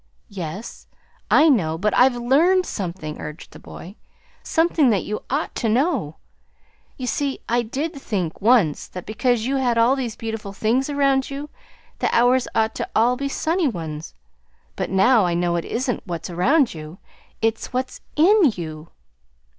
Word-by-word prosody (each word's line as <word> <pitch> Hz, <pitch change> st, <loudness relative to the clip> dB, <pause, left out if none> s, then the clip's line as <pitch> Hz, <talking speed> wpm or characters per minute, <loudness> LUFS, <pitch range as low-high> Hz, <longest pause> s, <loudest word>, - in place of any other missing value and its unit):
"Yes, 190 Hz, +3 st, -7 dB, 0.4 s
I 310 Hz, -, +6 dB
know, 170 Hz, -, +2 dB
but 210 Hz, +4 st, 0 dB
I've 255 Hz, 0 st, +5 dB
LEARNED 315 Hz, +10 st, +3 dB
something," 170 Hz, -5 st, -5 dB
urged 150 Hz, +2 st, -8 dB
the -, -, -13 dB
boy; 190 Hz, +5 st, -11 dB, 0.4 s
"something 325 Hz, -4 st, +2 dB
that 205 Hz, -4 st, +1 dB
you 210 Hz, -, -4 dB
ought 285 Hz, +5 st, -1 dB
to 225 Hz, -, 0 dB
know. 235 Hz, -, 0 dB, 0.8 s
You 255 Hz, -, -5 dB
see, 275 Hz, +2 st, -2 dB
I 240 Hz, +1 st, +2 dB
did 280 Hz, +8 st, -3 dB
think, 195 Hz, -, -4 dB
once, 210 Hz, -, +3 dB
that 180 Hz, -, -8 dB
because 225 Hz, +1 st, 0 dB
you 270 Hz, +2 st, 0 dB
had 245 Hz, -3 st, +1 dB
all 235 Hz, +3 st, +4 dB
these 245 Hz, -5 st, -4 dB
beautiful 220 Hz, -3 st, -5 dB
things 235 Hz, +7 st, 0 dB
around 275 Hz, -2 st, +1 dB
you, 280 Hz, +2 st, -6 dB, 0.5 s
the -, -, +1 dB
hours 245 Hz, +1 st, +3 dB
ought 220 Hz, 0 st, +2 dB
to -, -, -2 dB
be -, -, -20 dB
all 250 Hz, +5 st, +2 dB
sunny 330 Hz, +4 st, 0 dB
ones. 160 Hz, -, -5 dB, 0.6 s
But -, -, -3 dB
now 205 Hz, +4 st, +4 dB
I 170 Hz, -, 0 dB
know 175 Hz, 0 st, 0 dB
it 170 Hz, -, -2 dB
isn't 245 Hz, +1 st, -2 dB
what's 170 Hz, 0 st, -5 dB
around 255 Hz, -, +2 dB
you; 155 Hz, +2 st, -9 dB, 0.4 s
it's 225 Hz, 0 st, -1 dB
what 255 Hz, 0 st, -1 dB
is -, -, -13 dB
IN 380 Hz, +5 st, +5 dB
you!" 155 Hz, -2 st, -7 dB
235 Hz, 165 wpm, -22 LUFS, 185-270 Hz, 0.8 s, I